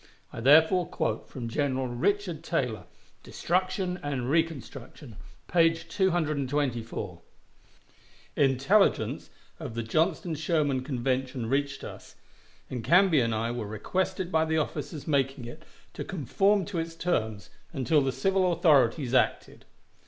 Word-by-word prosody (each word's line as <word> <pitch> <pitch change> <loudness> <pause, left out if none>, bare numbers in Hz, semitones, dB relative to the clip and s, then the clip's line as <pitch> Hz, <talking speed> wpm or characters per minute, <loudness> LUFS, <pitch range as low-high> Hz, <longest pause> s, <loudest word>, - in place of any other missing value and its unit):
I - - -6
therefore 160 +8 +5
quote - - -3
from 120 -3 -6
General 130 +1 -1
Richard 170 +6 -1
Taylor, 125 - -2 0.4
"Destruction 185 0 -1
and 135 -3 -2
Reconstruction," 145 -5 -3 0.3
page 165 -1 +2
224: 140 - -1 1.1
"Intelligence 140 +10 +2 0.3
of 115 - -7
the 115 - -2
Johnston 160 +7 0
Sherman 150 -4 0
convention 130 -1 -2
reached 140 +2 -1
us, - - -10 0.5
and 125 -3 -5
Canby 180 -2 +5
and 115 -1 0
I 115 +2 -1
were 120 -3 -4
requested 185 - -2
by 160 -1 +3
the 160 0 0
officers 150 -1 -3
making 135 -3 0
it 120 - -9 0.3
to - - -5
conform 195 - +1
to 190 -4 -4
its 165 0 -4
terms 110 - -2 0.2
until 145 0 +2
the 135 -1 0
civil 185 +6 +1
authorities 145 -6 +3
acted." 130 - 0
145 Hz, 125 wpm, -28 LUFS, 125-170 Hz, 1.1 s, therefore